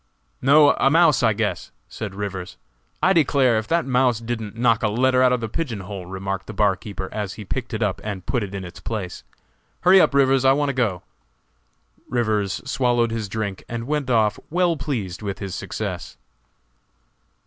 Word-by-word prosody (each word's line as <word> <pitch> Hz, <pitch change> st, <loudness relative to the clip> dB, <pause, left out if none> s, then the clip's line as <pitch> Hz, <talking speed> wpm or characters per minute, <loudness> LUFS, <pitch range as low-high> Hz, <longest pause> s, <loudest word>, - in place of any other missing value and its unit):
"No, 145 Hz, +2 st, +6 dB
a 135 Hz, -, +4 dB
mouse, 160 Hz, -4 st, +4 dB
I 110 Hz, -3 st, +3 dB
guess!" 105 Hz, 0 st, -2 dB, 0.2 s
said 105 Hz, -3 st, -7 dB
Rivers. 95 Hz, -3 st, -5 dB, 0.5 s
"I 190 Hz, -, +5 dB
declare, 135 Hz, -8 st, +3 dB
if 110 Hz, -, -7 dB
that 170 Hz, 0 st, +1 dB
mouse 125 Hz, -3 st, +2 dB
didn't 115 Hz, -2 st, -5 dB
knock 115 Hz, -1 st, +3 dB
a 110 Hz, -, +2 dB
letter 130 Hz, +4 st, +2 dB
out 130 Hz, -1 st, +5 dB
of 125 Hz, -1 st, +1 dB
the 115 Hz, -, -2 dB
pigeon 115 Hz, -4 st, -3 dB
hole!" 95 Hz, -1 st, -7 dB
remarked 95 Hz, +1 st, -4 dB
the 110 Hz, -, -6 dB
barkeeper 100 Hz, -1 st, -1 dB
as 105 Hz, -2 st, -3 dB
he 105 Hz, -, -9 dB
picked 125 Hz, +5 st, -4 dB
it 110 Hz, 0 st, -1 dB
up 100 Hz, -3 st, -1 dB
and 100 Hz, -4 st, -5 dB
put 125 Hz, -, 0 dB
it 100 Hz, -1 st, -5 dB
in 95 Hz, -1 st, -5 dB
its 90 Hz, -, -10 dB
place. 105 Hz, -, -5 dB, 0.6 s
"Hurry 185 Hz, +1 st, +7 dB
up, 140 Hz, -, +2 dB
Rivers, 135 Hz, -1 st, +4 dB
I 135 Hz, 0 st, +6 dB
want 145 Hz, 0 st, 0 dB
to -, -, -1 dB
go!" 115 Hz, -8 st, -1 dB, 1.1 s
Rivers 110 Hz, -5 st, 0 dB
swallowed 120 Hz, -3 st, +1 dB
his 110 Hz, -3 st, -3 dB
drink 100 Hz, -2 st, -4 dB
and 115 Hz, -1 st, -4 dB
went 145 Hz, -1 st, -2 dB
off 110 Hz, -3 st, +2 dB
well 175 Hz, 0 st, +2 dB
pleased 110 Hz, -, -4 dB
with 100 Hz, -2 st, -4 dB
his 100 Hz, -2 st, -6 dB
success. -, -, -5 dB
115 Hz, 185 wpm, -22 LUFS, 100-130 Hz, 1.1 s, Hurry